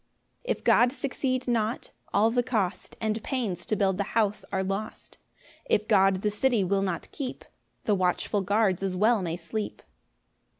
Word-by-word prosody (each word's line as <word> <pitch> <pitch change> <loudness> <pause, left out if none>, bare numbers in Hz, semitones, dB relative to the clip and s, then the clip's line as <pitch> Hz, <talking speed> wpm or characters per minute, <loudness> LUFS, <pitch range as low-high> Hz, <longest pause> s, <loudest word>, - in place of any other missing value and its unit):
1 - - +1
If - - -20
God 245 0 +5
succeed 260 -2 -2
not, 230 -1 -1 0.2
all 220 +2 +3
the 245 +1 +2
cost 220 -7 -2
And 220 0 -1
pains 210 - -3
to 215 - +1
build 195 -1 +1
the - - +2
house 210 -2 +1
are 190 -1 0
lost: 195 +3 -5 0.5
If 210 +1 +1
God 195 0 +4
the 210 - +2
city 225 0 +2
will 195 +1 +1
not 185 -4 -3
keep, 270 -4 -5 0.4
The 210 - +2
watchful 185 +2 +1
guards 200 -1 +2
as 190 -1 -1
well 215 +3 +3
may 170 -2 -2
sleep. 205 +5 -5
210 Hz, 170 wpm, -27 LUFS, 190-230 Hz, 0.5 s, God